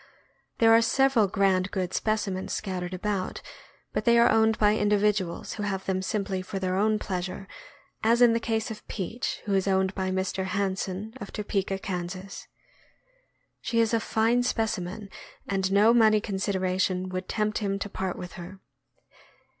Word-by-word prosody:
There 225 -1 +5
are 230 - +7
several 245 -1 +3
grand 195 -1 +2
good 185 -2 -3
specimens 205 -3 -1
scattered 185 -3 -3
about, 195 0 -3 0.5
but - - -1
they 235 -2 +5
are 235 0 +6
owned 220 0 +3
by 210 0 +4
individuals 205 -4 +1
who 210 - -6
have 195 -2 -2
them 190 -1 0
simply 195 -1 -2
for 185 +1 -6
their 185 -1 -1
own 215 +2 +2
pleasure, 185 -1 -4 0.6
as 230 +2 +4
in 240 -2 +6
the 230 - +1
case 225 -1 -2
of 215 - -9
Peach, 220 +5 -4
who 205 - -1
is 195 0 +1
owned 190 0 +2
by 190 -1 -2
Mr. 190 0 -1
Hanson, 195 +2 -2
of 200 - -7
Topeka, 195 -2 -2
Kan. 180 -3 -4 1.5
She 230 - 0
is 230 0 +2
a 230 - +3
fine 230 +2 +2
specimen, 210 -4 -2 0.4
and 190 -1 0
no 210 +4 +5
money 220 -2 +5
consideration 190 -2 -1
would 185 0 -5
tempt 215 -1 0
him 200 -2 -1
to 200 - -4
part 190 -2 -4
with 180 - -7
her. 185 +3 -9
200 Hz, 160 wpm, -27 LUFS, 190-220 Hz, 1.5 s, are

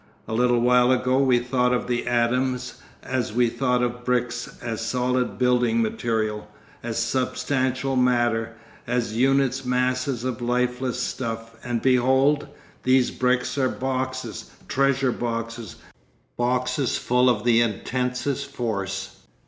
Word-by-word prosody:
A - - -4
little 120 +1 +3
while 125 +1 +4
ago 130 +1 +2
we 130 -3 +4
thought 125 0 +1
of - - -2
the 120 0 -2
atoms 125 +1 0 0.2
as 125 -4 -2
we 120 0 +3
thought 125 0 0
of 120 0 -3
bricks, 125 -1 -1
as 115 -2 -4
solid 125 +2 0
building 125 -2 +2
material, 110 -2 -1 0.3
as 115 -1 -4
substantial 130 +2 0
matter, 120 -3 +1 0.3
as 120 -2 -1
unit 135 +1 +2
masses 125 0 0
of 125 -2 -3
lifeless 125 +1 -1
stuff, 115 -2 -4
and 120 -2 -2
behold! 130 +3 +3 0.3
these 130 -1 +3
bricks 125 +2 0
are 130 -1 +2
boxes, 130 0 -3 0.2
treasure 135 -1 +2
boxes, 115 -2 -4 0.6
boxes 125 +1 0
full 125 +1 +3
of 110 -4 +1
the 120 -1 +4
intensest 125 +5 -2
force. 100 -7 -4
125 Hz, 125 wpm, -24 LUFS, 120-130 Hz, 0.6 s, while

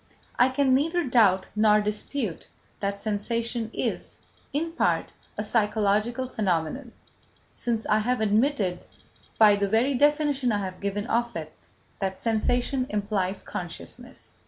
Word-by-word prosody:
I 250 - +6
can 260 0 +2
neither 325 +6 +2
doubt 215 - +3
nor 210 0 +5
dispute 210 - -2 0.3
that 200 0 -2
sensation 230 +2 -2
is, - - -3 0.3
in 320 +4 -1
part, 335 - 0 0.3
a 210 - -1
psychological 215 +3 +1
phenomenon, 210 - -2 0.6
since 230 -2 -2
I 215 - +3
have 245 +3 0
admitted, 215 -3 +1 0.6
by 210 -2 +7
the 200 0 0
very 235 +6 +2
definition 290 -2 +2
I 205 -2 0
have 185 -1 -7
given 200 +1 -2
of 235 0 0
it, 155 -1 -6 0.5
that 190 -1 -2
sensation 245 +4 0
implies 200 -2 -1
consciousness. 240 +9 -7
220 Hz, 130 wpm, -26 LUFS, 200-250 Hz, 0.6 s, by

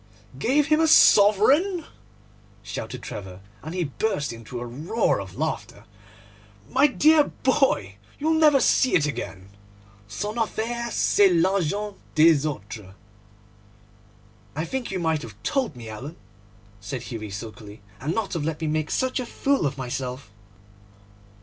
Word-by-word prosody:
'Gave 275 - +2
him 305 0 +3
a 325 - +4
sovereign!' 285 - +5 0.8
shouted 110 +3 -6
Trevor, 95 -2 -8 0.2
and 160 +4 -7
he 180 - 0
burst 145 - -2
into 115 +1 -8
a 120 - -5
roar 150 - -1
of 95 -2 -10
laughter. - - -4 0.8
'My 270 +3 +4
dear 300 +2 +4 0.2
boy, 260 - +1 0.2
you'll 315 +2 +1
never 305 -3 +5
see 260 0 +3
it 155 - +3
again. 100 -9 -5 0.6
Son 210 - -4
affaire 235 +2 -2
c'est 205 -3 +4
l'argent 195 +3 0 0.2
des 155 -1 +5
autres.' 105 -7 -7 1.6
'I 160 +2 -2
think 260 +6 -4
you 195 - -3
might 160 -3 0
have 110 -3 -9
told 260 - -1
me, 120 -2 -10
Alan,' 130 +9 -8 0.6
said 120 +5 -6
Hughie 110 -4 -6
sulkily, 105 0 -9 0.2
'and 150 +6 -2
not 220 -3 -2
have 165 -4 -2
let 155 0 -3
me 160 - -3
make 155 0 -1
such 260 0 0
a 250 - -3
fool 275 - 0
of 135 0 -5
myself. 125 -2 -5
160 Hz, 140 wpm, -24 LUFS, -, 1.6 s, sovereign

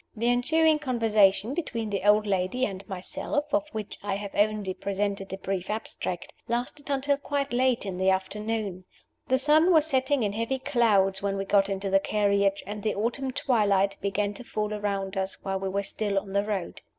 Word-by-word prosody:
The 230 +2 +1
ensuing 310 +6 +3
conversation 225 -5 +3
between 230 -10 -3
the 200 - -1
old 210 +1 +5
lady 200 +6 0
and 195 -3 -5
myself 285 +10 -3
(of 305 0 +2
which 215 -2 -6
I 200 -1 -2
have 200 0 -6
only 210 -2 +1
presented 200 0 -3
a 190 - -4
brief 190 -1 -3
abstract) 210 -4 -4
lasted 245 +5 -3
until 280 0 +1
quite 285 -1 -2
late 250 -2 +2
in 185 -2 -4
the 190 0 +3
afternoon. 195 0 -2 0.4
The 260 - +3
sun 305 +6 +4
was 315 -3 +5
setting 265 -3 +1
in 205 -1 0
heavy 230 +5 -1
clouds 220 -8 +2
when 200 0 -1
we 195 - -2
got 200 0 +3
into 195 0 -2
the 195 - +5
carriage, 200 -1 +1
and 205 +2 -6
the 215 0 -1
autumn 240 +6 -1
twilight 200 -7 +2
began 200 +1 -1
to 225 - -10
fall 210 -2 -3
around 200 -2 -2
us 190 0 -2
while 195 0 -2
we 195 0 -2
were 200 +1 -1
still 205 0 -2
on 195 0 -2
the 200 0 +2
road. 200 -4 -3
210 Hz, 190 wpm, -27 LUFS, 195-250 Hz, 0.4 s, old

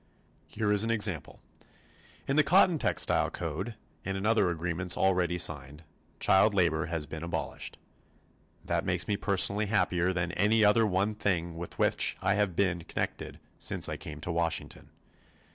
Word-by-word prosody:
Here 105 -1 -2
is 105 0 +3
an 115 - -1
example. 105 -9 0 0.8
In 135 - 0
the 155 - +5
Cotton 175 +1 +4
Textile - - +1
Code 90 +7 -5 0.3
and 95 +1 -3
in 95 - -4
other 110 -4 +3
agreements 85 +1 -1
already 90 -2 +1
signed, 75 -2 -4 0.4
child 95 +2 +3
labor 80 -5 +1
has 80 -3 -3
been 80 +1 -8
abolished. 80 -4 -5 0.9
That - - -1
makes - - -1
me 105 - 0
personally 100 +1 +2
happier 90 -3 +1
than 85 -2 -2
any 105 +4 +2
other 110 +2 +4
one 100 +2 0
thing 85 -5 -2
with 85 +1 -8
which - - +1
I - - +1
have 100 -4 0
been 90 -3 +1
connected - - -5 0.2
since - - +1
I - - -4
came 75 -1 -9
to 85 - -4
Washington. 85 -1 -3
95 Hz, 160 wpm, -29 LUFS, 85-105 Hz, 0.9 s, the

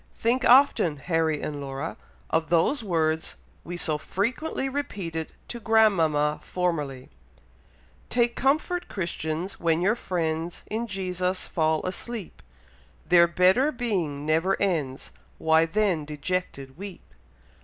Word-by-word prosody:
Think 245 +3 +1
often, 245 - +5
Harry 160 0 0
and 145 -1 -4
Laura, 135 -1 -4 0.4
of 160 -1 +1
those 175 - +2
words 160 -4 0 0.3
we 175 +1 -6
so 155 -3 -1
frequently 255 - -2
repeated 195 - -4 0.2
to 240 - -5
grandmama 170 -10 +3
formerly: 150 - -2 1.0
'Take 240 -1 +2
comfort, 310 +7 +1
Christians, 170 -1 -4
when 165 -1 +2
your 195 +5 +3
friends 165 -6 -3
In 230 +2 -2
Jesus 185 -2 -2
fall 160 -1 +1
asleep, 200 +2 -6 0.7
Their 170 -1 +6
better 185 - +4
being 180 - -2
never 165 +5 +2
ends, 155 -9 -1 0.3
Why 160 0 +3
then 190 -3 +1
dejected 150 -2 -4
weep? 195 -2 -8
175 Hz, 115 wpm, -26 LUFS, 160-215 Hz, 1.0 s, Their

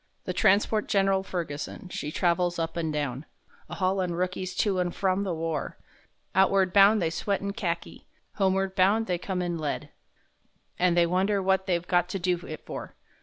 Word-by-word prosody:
The - - -3
transport 210 +1 +3
Gen'ral 195 -1 +2
Ferguson, 170 -2 -5
she 150 -4 -4
travels 175 +1 +1
up 165 -1 -2
and 165 -2 -1
down, 145 -2 -3 0.4
A - - -6
haulin' 185 -2 0
rookies 180 +1 -2
to 195 -2 +1
and 175 -1 -1
from 190 0 +1
the 195 -2 -2
war; 165 -1 -3 0.6
Outward 190 -1 +3
bound 205 +2 +7
they 165 -3 0
sweat 200 +4 -1
in 200 0 -4
Kharki; 175 -6 -4 0.3
homeward 195 -1 +1
bound 200 +4 +3
they 180 -4 -1
come 185 0 -2
in 175 -1 -2
lead 150 -2 -3 0.9
And 175 -1 +3
they 170 - +5
wonder 190 +4 +1
what 190 0 +1
they've 175 -1 0
got 175 -1 +2
to 195 - -2
do 180 -1 0
it 155 - -8
for. - - -7
185 Hz, 175 wpm, -27 LUFS, 170-195 Hz, 0.9 s, bound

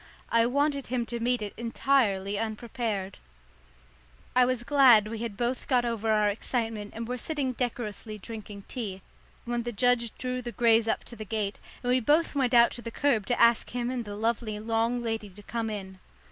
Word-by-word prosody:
I 230 0 +4
wanted 280 +2 0
him 245 -1 -1
to 235 0 -4
meet 240 -1 0
it 205 - -5
entirely 225 -5 +1
unprepared. 220 -3 -3 1.2
I 250 0 +6
was 250 -1 -1
glad 250 -6 +6
we 225 0 -5
had 225 -3 -4
both 245 +1 -1
got 250 -3 +3
over 225 -2 -1
our 210 -1 +3
excitement 220 0 -2
and 230 0 -4
were 250 +1 -3
sitting 280 -4 -2
decorously 230 -3 -4
drinking 210 -1 -8
tea, 200 -6 -5 0.4
when 240 0 -1
the 240 +1 -4
judge 240 0 +1
drew 255 0 -3
the 240 -1 -6
greys 230 -2 +4
up - - 0
to 240 - -10
the 220 - -6
gate, 210 -1 -3 0.2
and 245 - +1
we 255 - +4
both 300 +7 +2
went 265 -3 +1
out 235 0 +7
to 240 - -8
the 230 - -5
kerb 235 -4 +1
to 245 - 0
ask 235 -1 +5
him 245 0 -2
and 250 -2 -2
the 205 -2 -7
lovely 220 0 -1
long 230 +2 0
lady 225 -2 -3
to 205 +2 -14
come 230 0 -3
in. 190 -3 -6
235 Hz, 195 wpm, -28 LUFS, 215-245 Hz, 1.2 s, out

